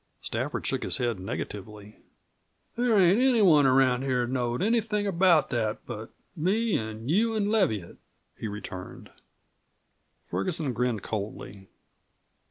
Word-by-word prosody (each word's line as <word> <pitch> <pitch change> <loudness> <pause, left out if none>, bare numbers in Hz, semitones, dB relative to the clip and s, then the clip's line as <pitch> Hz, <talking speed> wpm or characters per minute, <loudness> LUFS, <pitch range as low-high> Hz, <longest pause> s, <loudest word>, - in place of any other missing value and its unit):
Stafford - - -3
shook - - -1
his - - -2
head 120 -5 -1
negatively. 105 +1 -7 0.8
"There 240 -2 +2
ain't 190 +5 +5
anyone 200 - +5
around 130 -1 +3
here 130 -2 0
knowed 120 +2 -1
anything 215 -1 +1
about 180 -4 +3
that 110 -3 -2
but 115 -1 -7 0.3
me 200 +7 +1
an' 110 +1 -4
you 220 +9 +2
an' 205 -1 0
Leviatt," 110 - 0 0.4
he 110 - -5
returned. 100 -3 -8 1.1
Ferguson 130 - -2
grinned 120 -3 -1
coldly. 100 -2 -6
130 Hz, 120 wpm, -27 LUFS, -, 1.1 s, ain't